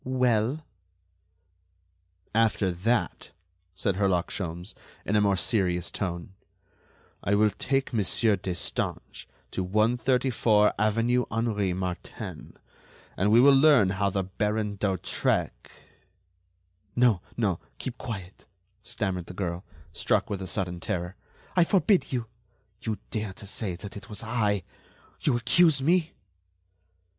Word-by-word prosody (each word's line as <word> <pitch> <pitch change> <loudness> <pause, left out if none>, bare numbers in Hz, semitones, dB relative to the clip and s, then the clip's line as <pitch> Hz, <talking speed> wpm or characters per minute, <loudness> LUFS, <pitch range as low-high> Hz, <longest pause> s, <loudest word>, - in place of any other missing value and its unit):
"Well?" 125 +2 +1 1.7
"After 110 -4 +2
that," 110 +8 -1 0.5
said 95 0 -1
Herlock 95 -4 +1
Sholmes, 85 0 -4 0.3
in 105 - 0
a 105 - +5
more 100 -1 +3
serious 90 -5 +1
tone, 85 -2 -4 0.9
"I 100 - +2
will 105 0 +4
take 135 +3 -1
Monsieur 110 0 +2
Destange 90 -2 -4 0.2
to 95 - -2
134 115 +1 +2
avenue 115 +4 +2
Henri 105 -5 0
Martin, 90 -1 -6 0.6
and 100 +3 +1
we 115 - +7
will 140 +3 +7
learn 135 -8 +6
how 100 0 +1
the 95 0 -1
Baron 105 +2 -2
d'Hautrec——" 95 -2 -1 1.3
"No, 120 -7 +4 0.2
no, 100 -7 +1 0.2
keep 130 -2 -6
quiet," 95 -6 -7 0.4
stammered 95 -6 -3
the 90 - -9
girl, 90 -1 -3 0.3
struck - - 0
with 100 -1 -3
a 95 - -5
sudden 90 -1 -2
terror, 90 -1 -3 0.4
"I 180 - +6
forbid 195 +2 +2
you!... 125 -3 -1 0.6
you 110 -4 -2
dare 105 -3 -3
to 100 - -9
say 100 -2 -4
that 100 +3 -9
it 100 - -10
was 105 +1 -7
I... 105 -4 0 0.6
you 130 -5 +2
accuse 145 +6 +4
me?..." 165 +4 +2
105 Hz, 120 wpm, -27 LUFS, 95-120 Hz, 1.7 s, we